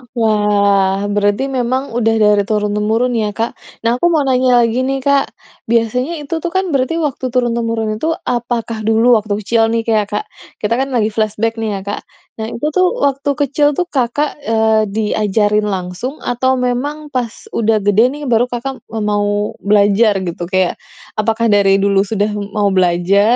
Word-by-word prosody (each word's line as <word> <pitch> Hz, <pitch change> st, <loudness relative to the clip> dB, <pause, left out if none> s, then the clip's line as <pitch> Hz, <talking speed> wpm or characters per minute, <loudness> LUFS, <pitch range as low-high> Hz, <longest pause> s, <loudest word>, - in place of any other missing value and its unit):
Wah. 205 Hz, -3 st, +2 dB
Berarti 205 Hz, +6 st, 0 dB
memang 260 Hz, +1 st, -1 dB
udah 225 Hz, -1 st, +1 dB
dari 210 Hz, -2 st, +4 dB
turun-temurun 210 Hz, +3 st, 0 dB
ya, 210 Hz, -1 st, -2 dB
Kak? 230 Hz, +1 st, -1 dB, 0.3 s
Nah, 235 Hz, +2 st, +1 dB
aku 345 Hz, -, +3 dB
mau 320 Hz, -4 st, +2 dB
tanya 255 Hz, -2 st, +3 dB
lagi 230 Hz, +2 st, 0 dB
nih 265 Hz, +1 st, -1 dB
Kak. 280 Hz, 0 st, +2 dB, 0.4 s
Biasanya 235 Hz, +7 st, 0 dB
itu 325 Hz, +3 st, -3 dB
tuh 345 Hz, -, -3 dB
kan 375 Hz, -2 st, 0 dB
berarti 275 Hz, +2 st, 0 dB
waktu 295 Hz, -5 st, -2 dB
turun-temurun 230 Hz, -3 st, -1 dB
itu, 325 Hz, +5 st, 0 dB
apakah 235 Hz, -2 st, -2 dB
dulu 225 Hz, +2 st, +4 dB
waktu 210 Hz, -1 st, -3 dB
kecil 225 Hz, +2 st, +2 dB
nih 230 Hz, 0 st, 0 dB
k 230 Hz, -, -5 dB
ya 215 Hz, -1 st, +3 dB
Kak, -, -, -3 dB, 0.4 s
kita 210 Hz, +2 st, +1 dB
kan 270 Hz, -, 0 dB
lagi 220 Hz, -2 st, +1 dB
flashback 220 Hz, +1 st, -1 dB
nih 220 Hz, -1 st, -2 dB
ya -, -, -4 dB
Kak, 205 Hz, +1 st, -4 dB, 0.4 s
nah 220 Hz, -, -2 dB
itu 235 Hz, +4 st, -5 dB
tuh 370 Hz, -, +4 dB, 0.2 s
waktu 280 Hz, +1 st, 0 dB
kecil 290 Hz, +1 st, +2 dB
tuh 360 Hz, -, +1 dB
Kakak, 275 Hz, +3 st, -1 dB
eee, 220 Hz, -1 st, +2 dB
diajarin 210 Hz, 0 st, +1 dB
langsung? 190 Hz, +7 st, -4 dB
Atau 250 Hz, +2 st, +1 dB
memang 270 Hz, +5 st, -2 dB
pas 245 Hz, -4 st, -2 dB, 0.2 s
udah 225 Hz, -, +1 dB
gede 205 Hz, +4 st, +4 dB
nih 295 Hz, 0 st, -8 dB
baru 230 Hz, +1 st, +4 dB
Kakak 250 Hz, +2 st, -5 dB
m 220 Hz, -1 st, -4 dB
mau 205 Hz, 0 st, 0 dB
belajar, 205 Hz, 0 st, +3 dB
gitu? 175 Hz, -1 st, -4 dB
Kayak 185 Hz, -1 st, 0 dB, 0.4 s
apakah 225 Hz, +1 st, +1 dB
dari 200 Hz, -1 st, +4 dB
dulu 200 Hz, 0 st, +2 dB
sudah 205 Hz, 0 st, 0 dB, 0.3 s
mau 205 Hz, -1 st, +2 dB
belajar 190 Hz, +4 st, +3 dB
225 Hz, 170 wpm, -16 LUFS, 210-250 Hz, 0.4 s, dari